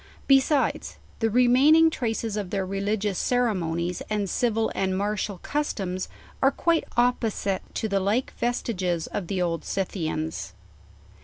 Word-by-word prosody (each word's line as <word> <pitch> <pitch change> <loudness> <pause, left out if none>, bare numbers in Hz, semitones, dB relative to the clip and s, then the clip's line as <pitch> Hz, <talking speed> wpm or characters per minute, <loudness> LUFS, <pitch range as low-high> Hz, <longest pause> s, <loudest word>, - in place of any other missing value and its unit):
Besides, 275 +1 +2 0.2
the 225 - +2
remaining 265 +8 +5
traces 225 -5 -2
of 205 -4 -3
their 195 -1 -1
religious 200 +1 -1
ceremonies 180 -8 0
and 210 -2 0
civil 225 +2 0
and 190 -1 0
martial 205 0 -2
customs 195 -11 -2 0.3
are 270 - +6
quiie 335 +3 +2 0.2
opposite 225 -5 +1
to 220 - -1
the 200 -2 +1
like 210 +7 0
vestiges 185 -8 -1
of 185 - -4
the 185 -1 0
Old 165 -1 -2
Scythians. 160 - -3
205 Hz, 130 wpm, -26 LUFS, 185-245 Hz, 0.3 s, are